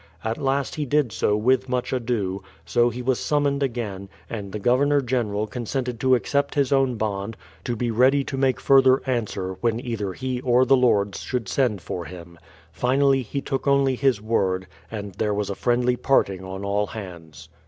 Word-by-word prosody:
At 110 Hz, +3 st, -2 dB
last 135 Hz, 0 st, 0 dB
he 150 Hz, -, -2 dB
did 145 Hz, -3 st, +2 dB
so 105 Hz, 0 st, +1 dB
with 130 Hz, +4 st, +2 dB
much 125 Hz, 0 st, -1 dB
ado; 110 Hz, -6 st, -1 dB, 0.2 s
so 120 Hz, 0 st, +3 dB
he 125 Hz, +1 st, -6 dB
was 130 Hz, 0 st, +1 dB
summoned 145 Hz, -1 st, 0 dB
again, 110 Hz, -7 st, -3 dB, 0.2 s
and 100 Hz, -4 st, -5 dB
the 105 Hz, -, -4 dB
Governor 135 Hz, +7 st, +3 dB
General 115 Hz, -5 st, -1 dB
con 120 Hz, +2 st, -6 dB
sented 125 Hz, -1 st, -3 dB
to 130 Hz, +1 st, +4 dB
accept 140 Hz, +3 st, -1 dB
his 140 Hz, -3 st, +1 dB
own 135 Hz, -2 st, +2 dB
bond, 105 Hz, 0 st, -3 dB, 0.3 s
to 120 Hz, -, -1 dB
be 120 Hz, +1 st, -1 dB
ready 130 Hz, +5 st, +4 dB
to 135 Hz, -, -5 dB
make 135 Hz, -1 st, +1 dB
further 135 Hz, -1 st, +5 dB
answer, 100 Hz, -7 st, -2 dB
when 115 Hz, -1 st, +1 dB
either 115 Hz, -6 st, -3 dB
he 130 Hz, +1 st, -3 dB
or 125 Hz, 0 st, +3 dB
the 135 Hz, -, +5 dB
Lords 105 Hz, -6 st, +2 dB
should 125 Hz, -5 st, -3 dB
send 105 Hz, -4 st, 0 dB
for 85 Hz, -2 st, -5 dB
him. 85 Hz, -1 st, -11 dB, 0.3 s
Finally, 135 Hz, +2 st, +2 dB
he 140 Hz, +4 st, -4 dB
took 135 Hz, +1 st, -3 dB
only 140 Hz, -1 st, +3 dB
his 130 Hz, -3 st, +1 dB
word, 95 Hz, -4 st, 0 dB, 0.2 s
and 105 Hz, -3 st, -6 dB
there 105 Hz, +3 st, -1 dB
was 105 Hz, -1 st, -2 dB
a -, -, -1 dB
friendly 125 Hz, +2 st, +1 dB
parting 100 Hz, -8 st, +1 dB
on 95 Hz, +1 st, -6 dB
all 105 Hz, +1 st, 0 dB
hands. 85 Hz, -7 st, -10 dB
120 Hz, 190 wpm, -24 LUFS, 105-130 Hz, 0.3 s, further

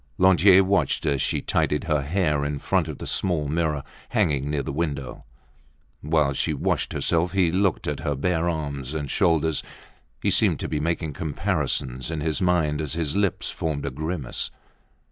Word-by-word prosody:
Lantier 95 Hz, +1 st, +6 dB
watched 95 Hz, -8 st, +1 dB
as 70 Hz, -3 st, +1 dB
she -, -, 0 dB
tidied 75 Hz, -, +1 dB
her 75 Hz, -4 st, +1 dB
hair 75 Hz, -1 st, 0 dB
in 70 Hz, 0 st, -2 dB
front -, -, 0 dB
of -, -, -6 dB
the -, -, -7 dB
small 85 Hz, -6 st, 0 dB
mirror 75 Hz, -2 st, 0 dB, 0.3 s
hanging 70 Hz, -1 st, +1 dB
near 75 Hz, -1 st, -1 dB
the -, -, -4 dB
window. 70 Hz, -4 st, -3 dB, 0.8 s
While 75 Hz, -2 st, +2 dB
she -, -, -1 dB
washed -, -, -1 dB
herself 85 Hz, +2 st, +1 dB
he 90 Hz, -4 st, +3 dB
looked 95 Hz, -1 st, +1 dB
at -, -, -2 dB
her 75 Hz, -, -1 dB
bare 85 Hz, +4 st, 0 dB
arms 70 Hz, -3 st, -4 dB
and 75 Hz, -3 st, -3 dB
shoulders. 80 Hz, -2 st, +2 dB, 0.6 s
He -, -, +1 dB
seemed -, -, +3 dB
to -, -, -2 dB
be 75 Hz, -, -2 dB
making 80 Hz, 0 st, -1 dB
comparisons 75 Hz, -5 st, -1 dB
in 80 Hz, -2 st, -3 dB
his 80 Hz, +3 st, -1 dB
mind 80 Hz, -5 st, +2 dB
as 75 Hz, -1 st, -2 dB
his 80 Hz, -3 st, -1 dB
lips 100 Hz, -2 st, 0 dB
formed 75 Hz, -3 st, -3 dB
a 70 Hz, -, -2 dB
grimace. 75 Hz, -1 st, -3 dB
80 Hz, 175 wpm, -24 LUFS, 70-85 Hz, 0.8 s, Lantier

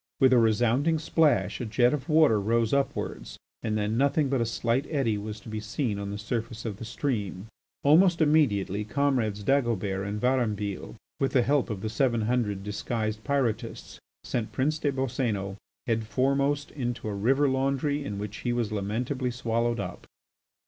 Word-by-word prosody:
With 130 Hz, -1 st, +6 dB
a 125 Hz, -, +6 dB
resounding 120 Hz, +8 st, +3 dB
splash 145 Hz, -, +2 dB
a -, -, -2 dB
jet 120 Hz, +4 st, +3 dB
of 150 Hz, +2 st, -4 dB
water 155 Hz, -8 st, +5 dB
rose 115 Hz, +3 st, +1 dB
upwards, 140 Hz, 0 st, -2 dB, 0.2 s
and 110 Hz, -1 st, -1 dB
then 105 Hz, +2 st, 0 dB
nothing 140 Hz, +1 st, +2 dB
but 135 Hz, -2 st, +1 dB
a 115 Hz, -, 0 dB
slight 115 Hz, +4 st, 0 dB
eddy 135 Hz, -8 st, +1 dB
was 105 Hz, +1 st, -5 dB
to -, -, -14 dB
be 110 Hz, -1 st, -4 dB
seen 110 Hz, 0 st, -2 dB
on 100 Hz, 0 st, -4 dB
the 100 Hz, -, -4 dB
surface 115 Hz, +1 st, -4 dB
of 105 Hz, -4 st, -4 dB
the 115 Hz, -, -7 dB
stream. 110 Hz, -6 st, -3 dB, 0.4 s
Almost 170 Hz, +4 st, +5 dB
immediately 110 Hz, -, +2 dB
comrades 110 Hz, -3 st, 0 dB
Dagobert 105 Hz, -7 st, 0 dB
and 105 Hz, +1 st, -3 dB
Varambille, 105 Hz, -, -1 dB, 0.2 s
with 135 Hz, -, 0 dB
the 125 Hz, -, +4 dB
help 140 Hz, +1 st, +1 dB
of 105 Hz, -4 st, -4 dB
the 110 Hz, -, -2 dB
seven 115 Hz, 0 st, +1 dB
hundred 105 Hz, -4 st, 0 dB
disguised 110 Hz, +1 st, -3 dB
Pyrotists, 135 Hz, -5 st, -2 dB, 0.2 s
sent 110 Hz, -, -3 dB
Prince 150 Hz, +4 st, 0 dB
des 145 Hz, -, +1 dB
Boscénos 115 Hz, -7 st, -2 dB, 0.3 s
head 115 Hz, -2 st, -1 dB
foremost 140 Hz, +5 st, +1 dB
into 120 Hz, -5 st, -4 dB
a 105 Hz, -, -2 dB
river 135 Hz, +8 st, +2 dB
laundry 135 Hz, +2 st, 0 dB
in 105 Hz, -7 st, -4 dB
which 105 Hz, +1 st, -5 dB
he 120 Hz, -, -2 dB
was 120 Hz, -3 st, -1 dB
lamentably 115 Hz, +6 st, -2 dB
swallowed 120 Hz, -1 st, -1 dB
up. -, -, -6 dB
120 Hz, 170 wpm, -27 LUFS, 105-135 Hz, 0.4 s, With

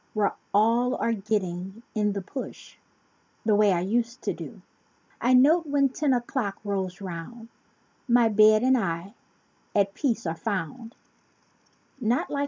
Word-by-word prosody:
Where 210 Hz, -1 st, +1 dB, 0.2 s
all 230 Hz, +5 st, +3 dB
are 230 Hz, -, 0 dB
getting 195 Hz, -1 st, -3 dB
"in 210 Hz, -2 st, +1 dB
the 200 Hz, -1 st, -4 dB
push," 260 Hz, +8 st, -8 dB, 0.7 s
The 215 Hz, -, +3 dB
way 205 Hz, -1 st, +4 dB
I 175 Hz, -2 st, +1 dB
used 235 Hz, +6 st, -1 dB
to -, -, -1 dB
do. -, -, -10 dB, 0.6 s
I 250 Hz, +2 st, +4 dB
note 310 Hz, +6 st, +5 dB
when 280 Hz, -1 st, +2 dB
ten 285 Hz, +2 st, 0 dB
o'clock 240 Hz, -4 st, -1 dB
rolls 190 Hz, -2 st, -3 dB
'round 195 Hz, +6 st, -8 dB, 0.6 s
My 240 Hz, -1 st, +5 dB
bed 215 Hz, +1 st, +5 dB
and 260 Hz, +1 st, +4 dB
I 185 Hz, -3 st, -2 dB, 0.6 s
at 200 Hz, -1 st, +2 dB
peace 235 Hz, -5 st, -1 dB
are 160 Hz, -, -1 dB
found— 225 Hz, +5 st, -4 dB, 1.0 s
Not 240 Hz, +1 st, +1 dB
like -, -, -9 dB
w? 285 Hz, -, -2 dB
220 Hz, 150 wpm, -26 LUFS, 195-245 Hz, 1.0 s, note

